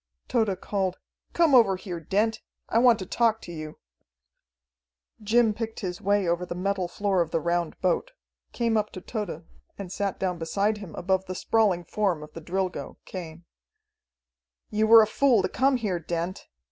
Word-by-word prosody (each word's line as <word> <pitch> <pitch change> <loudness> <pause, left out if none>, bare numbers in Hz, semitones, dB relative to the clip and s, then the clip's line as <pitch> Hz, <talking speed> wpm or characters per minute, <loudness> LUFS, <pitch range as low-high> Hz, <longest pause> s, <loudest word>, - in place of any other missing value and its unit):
Tode 220 -6 +1
called 190 -3 -1 0.4
"Come 335 -4 +3
over 225 -7 +6
here, 185 -2 -6
Dent! 210 +7 0 0.3
I 230 - +2
want 240 -2 +6
to 185 - -6
talk 225 +3 +2
to - - -8
you!" 155 -2 -7 1.4
Jim 220 +1 +3
picked 225 +1 -5
his 180 -3 -4
way 200 -1 +2
over 170 +1 0
the 175 -1 -5
metal 190 0 -1
floor 195 0 0
of 165 - -1
the 165 - 0
round 170 0 -1
boat, 185 - +1 0.4
came 230 -2 +1
up 210 0 0
to 185 - -7
Tode, 185 -7 -5 0.3
and 195 -3 -7
sat 195 -1 -2
down 180 -2 -2
beside 200 +6 0
him 195 -5 -9
above 190 +1 0
the 185 - -4
sprawling 200 -4 +2
form 180 -4 -1
of 150 - -12
the 165 - -8
Drilgo, 185 +2 -3
Cain. 170 -2 -8 1.3
"You 215 +1 +2
were 225 0 +9
a - - +3
fool 235 -1 +3
to - - +2
come 265 0 +2
here, 200 -7 -2
Dent." 170 +2 -4
195 Hz, 175 wpm, -26 LUFS, 175-220 Hz, 1.4 s, were